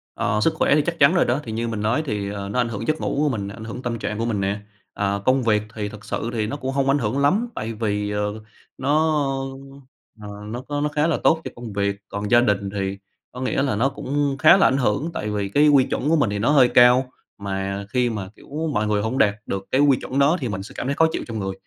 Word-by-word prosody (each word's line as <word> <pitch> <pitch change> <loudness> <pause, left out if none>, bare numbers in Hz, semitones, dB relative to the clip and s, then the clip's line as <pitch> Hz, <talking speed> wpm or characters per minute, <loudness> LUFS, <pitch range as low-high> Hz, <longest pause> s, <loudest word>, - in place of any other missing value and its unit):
Ờ, 105 +1 0
sức 160 +7 +2
khỏe 145 - +2
thì 150 - +4
chắc 170 -1 -2
chắn 140 +6 +5
rồi 175 - +4
đó, 125 +5 0
thì 110 - -6
như 115 +1 -2
mình 110 -2 -3
nói 120 +9 +1
thì, 100 -4 -2
ờ, 100 -1 -5
nó 105 - -3
ảnh 120 - 0
hưởng 115 +3 -5
giấc 155 0 0
ngủ - - -2
của 150 0 +3
mình, 100 -6 -3
ảnh 110 +2 -9
hưởng 125 +3 -7
tâm 115 -1 -3
trạng 105 0 -4
của 115 - -1
mình 110 -4 -1
nè. 100 +2 -1 0.4
À, 100 0 -1
công 130 0 +3
việc 105 -2 +2
thì 105 -2 -3
thực 105 0 -11
sự 115 - -3
thì 110 -2 -1
nó 145 - -4
cũng 135 -1 -4
hông 135 0 0
ảnh 140 +1 +3
hưởng 115 +3 -1
lắm 195 +12 +2
tại 110 +1 -4
vì, 105 -2 -2
ờ, 105 +1 -3 0.4
nó, 150 0 +1 0.9
ờ, 105 - -8 0.2
nó 120 +4 -5
có 145 +2 -4
nó 150 - 0
khá 150 +2 +1
là 165 - +1
tốt 160 0 +4
cho - - -6
công 120 -3 -8
việc. 100 0 0
Còn 100 +2 -4
gia 120 0 +7
đình 100 -4 0
thì 95 -1 -3 0.3
có 125 - -8
nghĩa 130 +1 0
là 130 -7 0
nó 130 +6 +2
cũng 140 0 -2
khá 175 +4 +7
là 190 - +5
ảnh 135 - +1
hưởng 140 +6 0
tại 105 - -3
vì 100 -2 -2
cái 150 +8 +4
quy 140 -3 +6
chuẩn 145 - -2
của 165 - +4
mình 135 -9 +2
thì 100 0 -2
nó 120 +7 +2
hơi 135 -4 +6
cao, 125 +1 +5 0.3
mà 100 0 -4
khi 125 0 +1
mà, 100 -4 -5
kiểu, 155 +3 -5
mọi 105 +1 0
người 105 -1 +1
hông 115 +5 -2
đạt 100 -1 +3
được 95 0 -4
cái 135 - +3
quy 140 -3 +5
chuẩn 135 +2 -3
đó 150 +6 +4
thì 125 - -2
mình 95 -1 -4
sẽ - - -11
cảm 125 - -3
thấy 140 - 0
khó 160 - +4
chịu - - -3
trong 110 -2 -4
người, 95 -1 -3
115 Hz, 280 wpm, -22 LUFS, 105-140 Hz, 0.9 s, gia